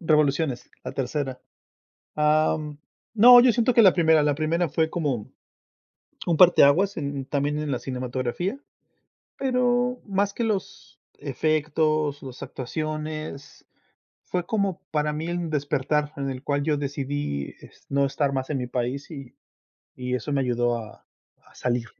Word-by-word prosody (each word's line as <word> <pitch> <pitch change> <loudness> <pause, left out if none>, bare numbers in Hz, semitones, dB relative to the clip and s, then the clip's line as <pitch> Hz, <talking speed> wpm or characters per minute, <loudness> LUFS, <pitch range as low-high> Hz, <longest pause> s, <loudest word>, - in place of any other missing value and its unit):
Revoluciones, 150 -5 +1
la - - -5
tercera. 135 0 -3 0.7
Am, 150 0 +1 0.4
no, 245 +3 +9
yo 245 0 +5
siento 235 +2 +2
que 230 - +7
la 190 -4 +7
primera, 160 -3 +4
la 145 -1 +2
primera 165 +3 0
fue 160 +2 0
como 140 -11 -2 1.0
un 170 -2 +2
parteaguas 180 +2 +5
en 140 -3 -3
también 145 +2 -1
en 150 -1 -3
la 125 - -1
cinematografía. 130 - -3 0.8
Pero 250 -1 +1
más 200 0 0
que 235 - -2
los 210 -4 -4
efectos, 155 +1 0
las 130 -2 -9
actuaciones, 155 +1 -5 0.6
fue 180 -1 -3
como 200 -4 -1
para 150 0 0
mí 155 +2 -4
un 175 -1 -3
despertar 150 0 0
en 140 -1 -3
el 130 -1 -6
cual 145 0 -1
yo 150 -1 +1
decidí 140 - -3
es - - -18
no 140 0 +2
estar 140 0 -1
más 130 0 -3
en 145 - -1
mi 125 - -3
país 125 +4 -3
y 135 -5 -9 0.6
y 125 0 -3
eso 125 +4 -4
me 140 - +2
ayudó 120 -1 0
a 110 -2 -12 0.4
a - - -22
salir. 120 -1 -1
150 Hz, 145 wpm, -25 LUFS, 135-165 Hz, 1.0 s, no